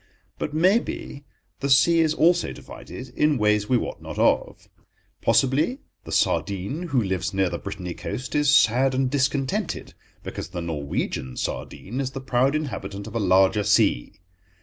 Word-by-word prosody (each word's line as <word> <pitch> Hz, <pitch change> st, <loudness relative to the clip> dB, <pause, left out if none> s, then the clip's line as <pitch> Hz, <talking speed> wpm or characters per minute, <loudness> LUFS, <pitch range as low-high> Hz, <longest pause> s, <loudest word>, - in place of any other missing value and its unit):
But, -, -, -3 dB
maybe, 170 Hz, -, 0 dB, 0.3 s
the 140 Hz, -, -2 dB
sea 155 Hz, +5 st, +5 dB
is 160 Hz, -1 st, +2 dB
also 170 Hz, +2 st, +3 dB
divided 130 Hz, 0 st, -10 dB
in 150 Hz, +3 st, +1 dB
ways 105 Hz, -1 st, +1 dB
we 125 Hz, -, +4 dB
wot -, -, -4 dB
not -, -, -8 dB
of. -, -, +1 dB, 0.5 s
Possibly 150 Hz, -, +2 dB, 0.2 s
the -, -, -8 dB
sardine 100 Hz, -, 0 dB
who 130 Hz, -7 st, +1 dB
lives 95 Hz, 0 st, -2 dB
near 95 Hz, -2 st, +1 dB
the -, -, -3 dB
Brittainy 90 Hz, -1 st, -6 dB
coast 120 Hz, +10 st, -6 dB
is 145 Hz, -1 st, +5 dB
sad 130 Hz, +4 st, +3 dB
and 130 Hz, -1 st, 0 dB
discontented 135 Hz, -1 st, -1 dB, 0.3 s
because -, -, -6 dB
the 90 Hz, -1 st, -5 dB
Norwegian 70 Hz, -5 st, -3 dB
sardine 125 Hz, +8 st, -4 dB
is 135 Hz, -1 st, -4 dB
the 135 Hz, -, -4 dB
proud 130 Hz, +2 st, +1 dB
inhabitant 100 Hz, -10 st, -4 dB
of 110 Hz, -, -9 dB
a 115 Hz, -, -1 dB
larger 95 Hz, +1 st, +4 dB
sea. 105 Hz, -, +2 dB
125 Hz, 155 wpm, -24 LUFS, 100-145 Hz, 0.5 s, sea